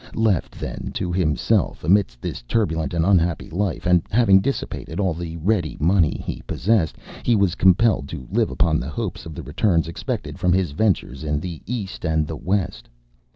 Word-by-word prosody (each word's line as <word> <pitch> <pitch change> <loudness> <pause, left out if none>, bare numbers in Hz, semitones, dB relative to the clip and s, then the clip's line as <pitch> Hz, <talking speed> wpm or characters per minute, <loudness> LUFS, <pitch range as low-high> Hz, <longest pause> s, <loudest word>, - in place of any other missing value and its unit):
Left, 110 -8 0
then, - - -5
to 90 - -2
himself, 85 -6 +1
amidst 80 -8 +2
this - - -4
turbulent 80 - -1
and 80 -1 +2
unhappy 85 -6 +2
life, 95 +1 -2
and 90 -1 +4
having 105 -3 +5
dissipated 95 - -3
all 95 -4 +1
the 85 0 -6
ready 85 -1 0
money 85 0 +2
he - - -4
possessed, 100 -4 +1 0.3
he 120 - +2
was 100 -4 +2
compelled 95 -4 +3
to 65 - -7
live - - +2
upon 80 0 +1
the 65 - -5
hopes 75 - -4
of 80 - -8
the - - -6
returns 85 -7 +1
expected 85 +2 -4
from 90 -1 +3
his 90 -4 +1
ventures 80 - 0
in 75 -1 0
the 85 -1 -6
East 105 -6 -4
and 80 -2 +1
the 80 - -5
West. 90 -8 -2
85 Hz, 180 wpm, -22 LUFS, 80-100 Hz, 0.3 s, having